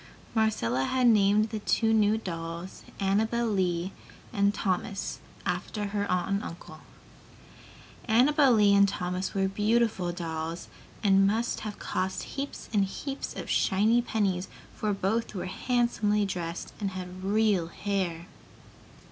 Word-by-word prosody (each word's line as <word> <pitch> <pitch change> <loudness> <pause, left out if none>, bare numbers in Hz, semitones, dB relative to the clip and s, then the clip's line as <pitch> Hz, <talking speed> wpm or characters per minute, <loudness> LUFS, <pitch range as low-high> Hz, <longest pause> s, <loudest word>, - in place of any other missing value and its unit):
Marcella 135 - +1
had 255 - +1
named 215 -1 +4
the 220 - -3
two 225 +2 +2
new 215 0 +4
dolls 170 -2 -6 0.2
Annabel 220 +4 +1
Lee 185 -4 0 0.4
and 200 0 +3
Thomas, 195 -1 -2 0.3
after 210 -2 -2
her 205 0 -2
aunt 180 -1 +1
and 200 +1 0
uncle. 160 -2 -9 1.3
Annabel 270 +5 +5
Lee 205 -2 +5
and 200 0 +6
Thomas 180 0 -3
were 195 -1 +2
beautiful 210 -2 +1
dolls 165 -1 -5 0.3
and 195 -1 +5
must 225 +4 0
have 210 -1 -6
cost 185 0 -2
heaps 280 +1 -6
and 200 -2 +3
heaps 270 +8 -5
of - - -6
shiny 215 +5 +3
pennies, 195 -6 -1 0.3
for 215 - -1
both 205 +4 -1
were 185 - -3
handsomely 210 0 +1
dressed 175 -3 -4
and 200 -2 -1
had 185 0 -7
real 205 -3 +2
hair! 180 -3 -2
200 Hz, 130 wpm, -28 LUFS, 185-220 Hz, 1.3 s, and